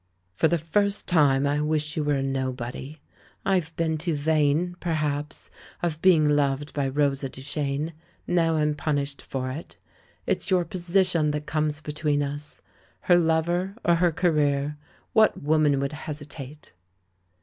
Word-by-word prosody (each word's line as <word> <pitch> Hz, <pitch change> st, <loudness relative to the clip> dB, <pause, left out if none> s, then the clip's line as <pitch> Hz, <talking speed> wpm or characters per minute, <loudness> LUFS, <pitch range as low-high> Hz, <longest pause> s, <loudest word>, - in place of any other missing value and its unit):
"For 130 Hz, -, +3 dB
the 170 Hz, -, +2 dB
first 200 Hz, +6 st, 0 dB
time 145 Hz, -5 st, +4 dB
I 145 Hz, +1 st, +1 dB
wish 150 Hz, 0 st, 0 dB
you 155 Hz, -, 0 dB
were 145 Hz, -1 st, +1 dB
a 135 Hz, -, -1 dB
nobody; 130 Hz, +2 st, -4 dB, 0.5 s
I've 175 Hz, -4 st, 0 dB
been 160 Hz, -2 st, 0 dB
too 165 Hz, 0 st, -1 dB
vain, 155 Hz, +3 st, +1 dB
perhaps, 150 Hz, -3 st, -2 dB, 0.3 s
of 160 Hz, -2 st, -1 dB
being 165 Hz, -5 st, +5 dB
loved 145 Hz, 0 st, +1 dB
by 140 Hz, -2 st, 0 dB
Rosa 140 Hz, 0 st, 0 dB
Duchene. 140 Hz, +3 st, -3 dB, 0.3 s
Now 165 Hz, -2 st, +2 dB
I'm 150 Hz, -1 st, +2 dB
punished 145 Hz, -1 st, -2 dB
for 130 Hz, -1 st, -4 dB
it 155 Hz, +6 st, -8 dB, 0.2 s
— -, -, -34 dB
it's -, -, -1 dB
your 180 Hz, -2 st, +3 dB
position 180 Hz, -4 st, +1 dB
that 150 Hz, 0 st, -3 dB
comes 150 Hz, -1 st, -1 dB
between 150 Hz, -1 st, 0 dB
us. 145 Hz, +1 st, -5 dB, 0.4 s
Her 175 Hz, -, +4 dB
lover, 175 Hz, +3 st, +1 dB
or 170 Hz, -, +5 dB
her 170 Hz, +1 st, +3 dB
career 150 Hz, -4 st, +1 dB, 0.2 s
— -, -, -35 dB
^what 220 Hz, -1 st, +5 dB
woman 150 Hz, -1 st, +2 dB
would 140 Hz, +2 st, -2 dB
hesitate?" 145 Hz, -1 st, -8 dB
150 Hz, 150 wpm, -26 LUFS, 145-165 Hz, 0.5 s, being